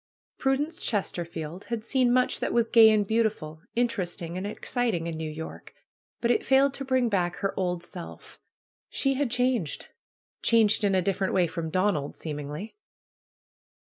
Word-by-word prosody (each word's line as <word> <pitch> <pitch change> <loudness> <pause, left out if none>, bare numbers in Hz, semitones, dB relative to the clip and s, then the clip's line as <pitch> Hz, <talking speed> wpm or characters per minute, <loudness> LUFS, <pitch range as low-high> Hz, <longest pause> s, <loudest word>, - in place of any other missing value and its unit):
Prudence 290 +5 0
Chesterfield 170 - -3
had 230 -2 -4
seen 255 -2 +2
much 255 0 +2
that - - -1
was 235 -1 +2
gay 225 -1 +8
and 215 -2 +3
beautiful, 210 -8 -1
interesting 185 -8 -1
and 185 +2 -3
exciting 220 -4 -2
in 165 -1 -3
New 160 0 -4
York. 160 - -8 0.5
But 235 - +2
it - - +2
failed 270 +1 +4
to 275 - -4
bring 260 -2 +2
back 180 -5 0
her 195 - -2
old 180 -2 -1
self. 170 0 -10 0.5
She 275 -1 +1
had 275 -1 0
changed; 245 - 0 0.5
changed 225 -2 +4
in 200 -2 +3
a 185 - +2
different 195 0 0
way 180 - +4
from 165 -1 -4
Donald, 180 -5 0
seemingly. 150 +6 -6
205 Hz, 155 wpm, -27 LUFS, 170-240 Hz, 0.5 s, gay